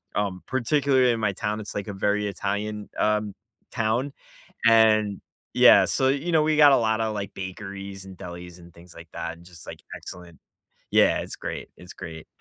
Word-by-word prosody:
um, 100 -3 -2
particularly 130 0 +2
in 115 - -3
my 105 -3 0
town, 105 +2 -3
it's 105 - -7
like 100 0 -4
a 100 - -5
very 105 +1 0
Italian, 105 +1 -4
um, 105 -1 +1 0.4
town, 115 +5 -1 0.5
and 110 -3 +4 0.3
Yeah, - - +7
so, 130 0 +1
you 145 +6 -1
know, 160 -2 +4
we 155 0 +1
got 145 -2 +8
a - - +6
lotta, 110 -1 +1
like, 100 -2 -5
bakeries, 95 0 -7
and 95 - -11
delis, 90 0 -9
and 85 0 -15
things 85 +1 -16
like 85 -1 -12
that, 85 0 -5
and 85 - -17
just, 85 -2 -14
like, - - -9
excellent 90 -2 -11 0.5
Yeah, - - +4
it's - - -7
great. - - -6
It's 90 +1 -12
great. 80 -3 -9
105 Hz, 185 wpm, -25 LUFS, 95-115 Hz, 0.5 s, got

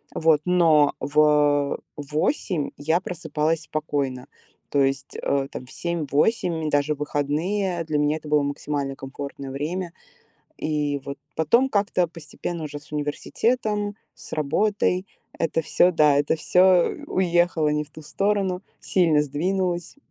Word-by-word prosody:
Вот, 160 -2 +3
но 165 -5 +4
в, 150 +1 0
э, 145 -1 +4 0.2
в 145 0 -8
8 160 - 0
я 160 +4 +1
просыпалась 160 -2 -2
спокойно, 140 -5 -3 0.4
то 140 - +2
есть, 135 0 -2
э, 140 -1 0
там 125 - -7
в 130 - -15
7-8, 170 +1 0
и - - 0
даже 145 +1 +1
выходные, 165 +6 -1
для 155 -2 -1
меня 150 +1 +2
это 155 - -11
было 150 -1 +4
максимально 140 -1 -3
комфортное 135 0 -7
время. 170 +5 -3 0.7
И 150 -2 -1
вот 140 0 -6 0.2
потом 235 - +3
как-то 200 -3 +1
постепенно, 165 0 -6
уже 145 -1 -6
с 150 - -20
университетом, 205 +8 -1 0.2
с - - -14
работой 185 +5 +1 0.3
это 165 0 0
всё, 180 +4 +4
да, 150 -3 +4
это 145 +2 +2
всё 180 +2 +4 0.2
уехало 175 -3 +2
не 150 0 0
в 145 - -24
ту 155 - -12
сторону, 195 +1 0 0.2
сильно 165 -5 +3
сдвинулось. 175 - -2
155 Hz, 140 wpm, -24 LUFS, 145-180 Hz, 0.7 s, но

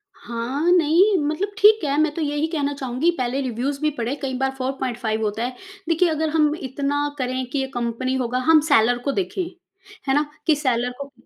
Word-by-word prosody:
हाँ। 255 +8 -2
नहीं, 360 +4 +4
मतलब 380 +7 -2
ठीक 430 -3 +6
है, 285 0 0
मैं 310 -1 +1
तो 330 - -3
यही 295 +1 0
कहना 290 -3 -1
चाहूँगी, 265 +4 -1
पहले 255 +2 -1
रिव्यूज 260 +3 -2
भी 305 - +2
पढ़े, 240 +4 -2
कई 265 -1 -2
बार 265 0 0
4.5 245 -4 -2
होता 215 +2 -1
है। 250 0 -3 0.3
देखिए, 330 +1 +3
अगर 315 0 0
हम 305 -1 +2
इतना 285 +2 -1
करें 255 0 -2
कि 280 - -2
ये 265 - -1
कंपनी 240 +2 -2
होगा 250 -1 -1
हम 320 -1 +8
सेलर 245 -2 +4
को - - +3
देखें, 375 +2 -2 0.6
है 270 - +3
ना? 295 +1 +2 0.2
कि 310 - +5
सेलर 250 -4 0
को 280 0 -7
275 Hz, 195 wpm, -22 LUFS, 250-310 Hz, 0.6 s, हम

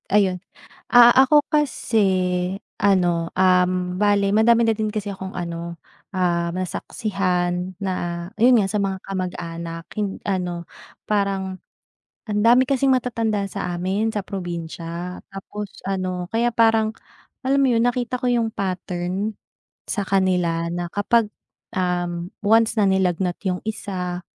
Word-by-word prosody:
Ayun, 190 -3 +2 0.5
ah, 240 0 +8
ako 285 +3 +5
kasi 290 -6 +1 0.8
ano, 175 -4 +2
um, 180 -1 +2
bale 200 -1 +3
madami 230 +2 +5
na 225 - +3
din 215 0 -2
kasi 210 -1 -4
akong 190 0 -7
ano, 170 -1 -5 0.4
um, 170 -2 +1
nasaksihan 185 -1 -2
na 195 -1 -2 0.5
ayun 245 +2 +6
nga 200 -3 +2
sa 210 - 0
mga 195 -1 -1
kamag 185 -2 -3
anak 165 0 -6
hin 205 -2 -2
ano 180 -3 -2 0.4
parang 195 -2 -1 0.7
andami 230 +5 +5
kasing 275 -1 +3
matatanda 230 -4 0
sa 180 -1 -3
amin 195 +5 -1
sa 205 - -1
probinsya 175 -1 -5
tapos 200 +1 -7 0.2
ano 185 -2 -2
kaya 235 +1 +1
parang 225 -1 +3 0.5
alam 275 +1 +3
mo 270 - +4
'yon 230 +1 +3
nakita 245 0 0
ko 250 - -5
yung 235 -2 +1
pattern 185 +2 -3 0.5
sa 205 - -1
kanila 180 -3 +1
na 175 0 -3
kapag, 220 +2 +2 0.5
um, 175 -1 -1 0.2
once 225 +1 +4
na 205 - +4
nilagnat 185 -2 +1
yung 180 -1 0
isa, 180 -4 -4
195 Hz, 130 wpm, -22 LUFS, 180-220 Hz, 0.8 s, ah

